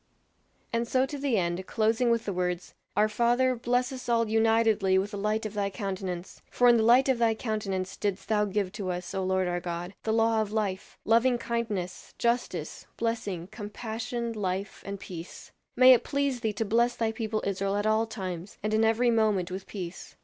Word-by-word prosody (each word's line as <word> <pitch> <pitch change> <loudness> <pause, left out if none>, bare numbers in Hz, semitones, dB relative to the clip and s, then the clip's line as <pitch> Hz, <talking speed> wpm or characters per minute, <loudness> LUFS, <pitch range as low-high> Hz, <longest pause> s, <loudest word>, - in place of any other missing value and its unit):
And 230 0 0
so 260 +2 +2
to 285 +1 -6
the 270 -5 +1
end, 175 0 -1
closing 225 +2 +2
with 230 -1 +1
the 200 - -2
words, 180 -1 -2 0.2
"Our 210 +1 +5
Father, 240 +4 +2
bless 245 +2 0
us 255 -2 -7
all 230 -1 +3
unitedly 220 -3 +3
with 195 +2 0
the 205 - -5
light 215 +2 0
of 215 - -4
thy 200 -1 0
countenance; 190 -3 -5
for 245 - +3
in 240 -1 +7
the - - +3
light 245 +4 +5
of 260 -3 +2
thy 225 -1 +3
countenance 195 -5 -3
didst 200 -1 -2
thou 210 -1 +2
give 200 -2 -1
to 200 -2 -4
us, 180 0 -4
O 190 - -1
Lord 190 0 +1
our 175 0 -1
God, 175 +1 -5
the 220 - -1
law 225 0 +3
of 210 -1 -3
life, 205 -3 -2
loving 235 +3 +4
kindness, 230 -6 -4
justice, 235 -9 -1
blessing, 215 -7 -2
compassion, 230 +2 -4
life, 195 -1 -3
and 200 0 -4
peace. 170 -2 -9 0.2
May 255 +1 +9
it 245 - +3
please 280 -3 0
thee 220 -3 -1
to 220 +2 -2
bless 235 +3 +2
thy 225 -1 0
people 220 -1 -3
Israel 195 0 -1
at 205 +1 -1
all 220 +1 +2
times, 185 -4 -6
and 215 0 -1
in 220 +1 +3
every 230 +2 +3
moment 210 -5 +2
with 190 +1 -6
peace. 185 -3 -7
215 Hz, 200 wpm, -28 LUFS, 190-235 Hz, 0.2 s, May